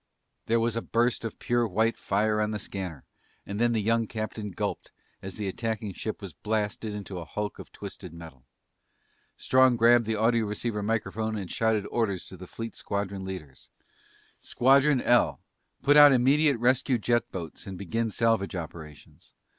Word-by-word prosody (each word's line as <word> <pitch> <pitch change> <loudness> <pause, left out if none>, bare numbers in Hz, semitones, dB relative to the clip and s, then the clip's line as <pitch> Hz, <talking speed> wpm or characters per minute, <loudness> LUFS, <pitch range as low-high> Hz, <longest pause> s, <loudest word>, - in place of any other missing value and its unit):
There 115 +1 +3
was 115 0 0
a 115 - -1
burst 120 +1 0
of 115 - -5
pure 120 -1 +1
white 110 +4 +1
fire 105 +2 0
on 105 - 0
the 105 - -2
scanner 95 -8 -6 0.4
and 100 +1 -5
then 120 0 +3
the 115 - +1
young 115 +1 +2
captain 110 -1 -4
gulped 90 - -4 0.3
as 95 -1 -7
the 105 -2 -3
attacking 110 0 -3
ship 110 +2 -5
was 95 -5 -7
blasted 105 +1 -2
into 100 -3 -6
a - - -6
hulk 105 +5 -5
of - - -11
twisted 100 -3 -9
metal. 80 -6 -12 0.9
Strong 130 -1 +4
grabbed 115 0 +5
the 110 -1 0
audioceiver 110 -1 0
microphone 110 0 -1
and 95 -4 -6
shouted 110 -2 +1
orders 100 -6 -1
to - - -9
the 90 +1 -10
fleet 115 +4 -7
squadron 100 -1 -3
leaders. 80 -9 -8 0.4
"... - - -32
Squadron 135 +1 +4
L! 120 0 +3 0.4
Put 145 +1 +5
out 145 -1 +10
immediate 140 +3 +4
rescue 125 +2 +2
jet 120 +1 0
boats 85 -1 -7
and 95 -1 -6
begin 115 +5 -2
salvage 110 -3 +1
operations. 80 -3 -10
110 Hz, 170 wpm, -27 LUFS, 100-115 Hz, 0.9 s, out